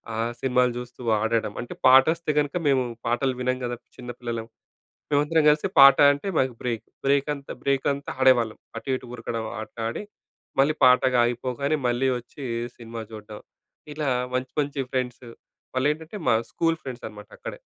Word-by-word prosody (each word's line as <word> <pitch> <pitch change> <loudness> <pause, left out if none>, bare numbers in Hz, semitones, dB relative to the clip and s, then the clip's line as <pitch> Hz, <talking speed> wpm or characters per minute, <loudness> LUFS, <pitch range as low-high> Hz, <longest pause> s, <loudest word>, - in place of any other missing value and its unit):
ఆ - - -3 0.2
సినిమాలు 125 -1 +2
జూస్తూ 125 0 -8 0.2
ఆడడం. 110 -1 0
అంటే, 120 - -7
పాటొస్తే 155 +5 +5
గనుక 145 +3 -1
మేము 130 -2 +3 0.2
పాటలు 130 +2 +1
వినం 130 0 0
గదా! 120 0 -3 0.2
చిన్న 125 -1 -7
పిల్లలం. 115 -2 -4 0.6
మేమందరం 150 +2 +3
గలిసి 150 +6 +2
పాట 135 0 +10 0.2
అంటే, 145 +8 -6
మాకు 130 -2 +1
బ్రేక్, 115 -3 -2 0.2
బ్రేకంతా 140 0 0
బ్రేకంతా 140 +1 0
ఆడేవాళ్ళం 120 -4 +4 0.2
అటు, - - -7
ఇటు 125 - -13
ఉరకడం, 115 -1 -4 0.2
ఆటలాడి, 115 - -5 0.6
మళ్ళీ 145 +3 +4
పాటగ 125 0 +5
ఆగిపోగానే 125 +5 -1
మళ్ళీ 120 +2 +1
వచ్చి 130 +4 -12 0.3
సినిమా 115 -1 -7
జూడ్డం. 105 -1 -9 0.5
ఇలా 150 -1 -3 0.3
మంచి, 130 0 -2
మంచి 140 0 -4
ఫ్రెండ్స్. 125 -1 -3 0.5
వాళ్ళేంటంటే, 155 +8 -1
మా 115 - +5 0.2
స్కూలు 165 -1 +1
ఫ్రెండ్సనమాట 110 -5 -8
అక్కడే. - - -7
130 Hz, 140 wpm, -25 LUFS, 120-140 Hz, 0.6 s, పాట